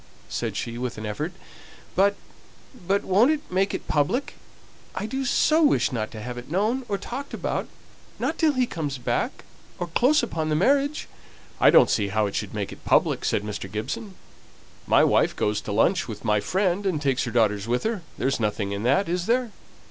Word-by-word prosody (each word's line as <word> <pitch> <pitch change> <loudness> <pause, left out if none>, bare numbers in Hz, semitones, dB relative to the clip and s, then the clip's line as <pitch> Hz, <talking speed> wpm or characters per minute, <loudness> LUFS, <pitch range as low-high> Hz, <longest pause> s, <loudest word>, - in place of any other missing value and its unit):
said - - -3
she, 120 0 -4
with 125 -2 -4
an 110 - -5
effort. 150 +11 -3 0.6
"But 200 +2 +4 0.7
but 200 +1 +2
won't 205 +8 +4
it 310 -1 -2
make 190 +2 +1
it - - -7
public? 180 - 0 0.6
I - - -3
do 265 +5 -3
so 310 +5 +3
wish 290 - +3
not 110 -4 -2
to 110 -2 -8
have 120 0 -5
it 120 - -12
known, 220 - 0
or 200 - 0
talked 270 +7 -6
about, - - -2 0.5
not 325 - -2
till 310 -2 +4
he 255 -2 +2
comes 150 - -4
back 125 - -2 0.3
or 175 - -2
close 250 - +3
upon 160 -9 -2
the 155 - +1
marriage." 280 - +2 0.5
"I - - +7
don't - - +6
see 105 -2 +1
how 105 +2 +1
it 100 - -3
should 105 0 -3
make 100 -2 -3
it - - -12
public," - - +2
said 100 - 0
Mr. 100 -3 -5
Gibson. 190 - -4 0.7
"My - - +5
wife - - +3
goes 105 0 0
to - - -6
lunch 165 - +2
with 110 -1 -8
my 105 -1 +3
friend, 185 - 0
and 170 -5 0
takes 135 -3 0
her - - -4
daughters 105 -3 +1
with 120 +1 0
her 220 -3 -1 0.2
there's 135 0 0
nothing 105 -2 -1
in 100 0 -3
that, 140 - +2
is 175 +1 -2
there?" 245 0 +1
165 Hz, 200 wpm, -25 LUFS, -, 0.7 s, I